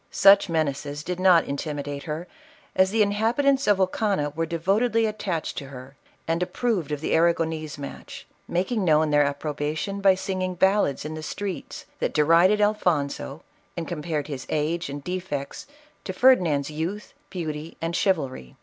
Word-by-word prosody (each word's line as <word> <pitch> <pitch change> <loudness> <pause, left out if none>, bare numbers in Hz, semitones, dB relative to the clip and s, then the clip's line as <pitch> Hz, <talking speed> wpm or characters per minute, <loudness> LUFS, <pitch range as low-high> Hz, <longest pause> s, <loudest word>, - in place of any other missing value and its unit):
Such 200 -1 +6
menaces 145 -2 -2
did 180 +2 -4
not 185 -3 +6
intimidate 145 0 -4
her, 160 +2 -4 0.5
as 190 0 +4
the 215 +1 +3
inhabitants 235 +7 +1
of 205 -2 +5
Ocana 190 -5 0
were 165 0 -1
devo 170 +5 +1
tedly 230 -2 +2
attached 195 -6 -3
to 140 - -9
her 130 0 -11 0.3
and 165 +1 0
approved 185 - -1
of 150 -1 -3
the - - -2
Arragonese 160 -2 +1
match, 140 -1 -9 0.2
making 190 +5 -1
known 155 -2 +3
their 145 0 +5
approbation 150 +6 -3
by 195 -1 +5
singing 185 -1 -3
ballads 190 -6 +2
in 155 - -4
the 155 - -6
streets, 195 +4 -5
that - - -2
derided 165 +7 +5
Alfonso 175 - 0 0.3
and 170 - -3
com 170 -4 -4
pared 150 -3 -2
his 140 -3 -6
age 155 +2 -1
and 140 0 -6
defects 180 - -5 0.4
to 190 - -4
Ferdinand's 175 - +3
}routh, 170 +7 -4 0.2
beauty 160 -3 -5
and 165 +1 -2
chivalry. 135 - -1
165 Hz, 160 wpm, -25 LUFS, 150-195 Hz, 0.5 s, Such